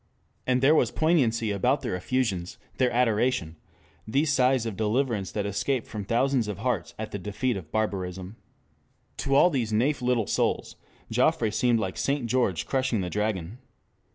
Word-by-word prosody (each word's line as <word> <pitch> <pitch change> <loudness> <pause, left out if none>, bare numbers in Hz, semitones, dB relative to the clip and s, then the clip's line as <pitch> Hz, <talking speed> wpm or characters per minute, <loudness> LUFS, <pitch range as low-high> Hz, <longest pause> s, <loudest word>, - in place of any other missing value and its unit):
And 130 0 +2
there 145 +3 +6
was 125 -7 +3
poignancy 120 -6 +1
about 125 +8 +1
their 120 -8 -2
effusions, 95 -3 -2 0.2
their 130 -1 +4
adoration, 120 -7 +1 0.5
these 140 +6 +1
sighs 130 -2 +3
of 110 -3 -3
deliverance 110 -1 0
that 105 -1 -2
escaped 115 +5 -1
from 105 -2 -6
thousands 120 +2 +1
of 105 - -4
hearts 120 -9 -2
at 110 0 -5
the 100 - -4
defeat 105 +6 -2
of 85 -5 -8
barbarism. 95 -2 -3 0.8
To 135 0 0
all 175 +5 +6
these 120 -7 -1
naif 125 +8 +1
little 125 -3 +1
souls, - - -1 0.4
Joffre 110 - +2
seemed 120 +2 +2
like 95 -4 -3
St. 140 -2 0
George 115 - 0
crushing 130 -5 0
the 90 -1 -4
dragon. 105 0 -2
115 Hz, 160 wpm, -26 LUFS, 100-130 Hz, 0.8 s, there